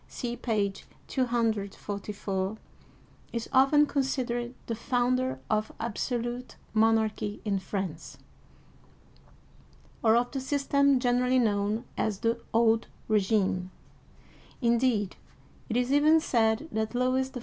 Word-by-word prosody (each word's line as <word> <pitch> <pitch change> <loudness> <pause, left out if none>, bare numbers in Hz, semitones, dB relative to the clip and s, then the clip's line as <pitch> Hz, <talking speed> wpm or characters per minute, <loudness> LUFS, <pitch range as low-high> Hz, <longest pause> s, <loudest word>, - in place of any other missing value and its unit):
(see 240 -2 -4
page 205 -5 -2 0.2
244), 205 -4 -2 0.7
is 235 -1 -3
often 275 +3 +6
considered 255 -4 -1
the 230 - -3
founder 255 +2 0
of 215 0 0
absolute 240 +2 -3 0.2
monarchy 220 -1 +1
in 200 -2 +1
France, 190 -4 -5 1.9
or 220 -1 +5
of 245 +1 +1
the 270 - -3
system 280 0 +2
generally 250 +1 +2
known 215 0 +1
as 210 -3 -1
the 230 0 0
Old 225 0 +3 0.2
Regime; 190 -3 +1 0.9
indeed, 235 -4 +1 0.5
it 230 - 0
is 250 +1 +1
even 305 +3 +5
said 230 -1 +1
that 220 +2 -2
Louis 255 +1 +1
XIV. 260 - -7
235 Hz, 105 wpm, -28 LUFS, 215-255 Hz, 1.9 s, often